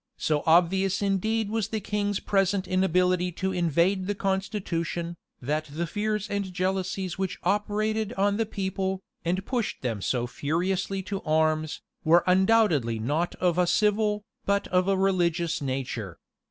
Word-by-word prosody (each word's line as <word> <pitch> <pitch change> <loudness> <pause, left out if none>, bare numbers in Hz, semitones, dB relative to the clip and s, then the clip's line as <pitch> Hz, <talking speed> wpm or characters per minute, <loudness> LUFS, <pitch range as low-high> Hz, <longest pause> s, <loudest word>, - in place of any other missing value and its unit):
So 150 -2 0
obvious 185 +4 +3
indeed 210 +2 0
was 220 -3 0
the 220 0 -2
king's 205 0 -1
present 195 -1 +1
inability 180 -1 +2
to 190 +3 -2
invade 175 +2 +1
the 205 - -1
constitution, 185 -4 -2 0.2
that 150 +4 -1
the 155 +3 -3
fears 210 +3 -2
and 200 -2 -2
jealousies 185 0 -2
which 190 -2 -2
operated 215 +1 0
on 200 0 +1
the 225 -1 0
people, 190 -1 -2 0.2
and 185 +3 -1
pushed 245 - -2
them 115 -5 -2
so 120 +4 0
furiously 185 +9 -1
to 195 +1 -4
arms, 155 0 +1 0.2
were 170 +2 +5
undoubtedly 185 - +3
not 145 +10 -1
of 180 -1 +1
a 180 - +3
civil, 210 +1 +2 0.2
but 200 0 +1
of 180 +1 +2
a 195 -1 +2
religious 175 -4 +1
nature. 125 -9 -3
185 Hz, 145 wpm, -27 LUFS, 170-200 Hz, 0.2 s, were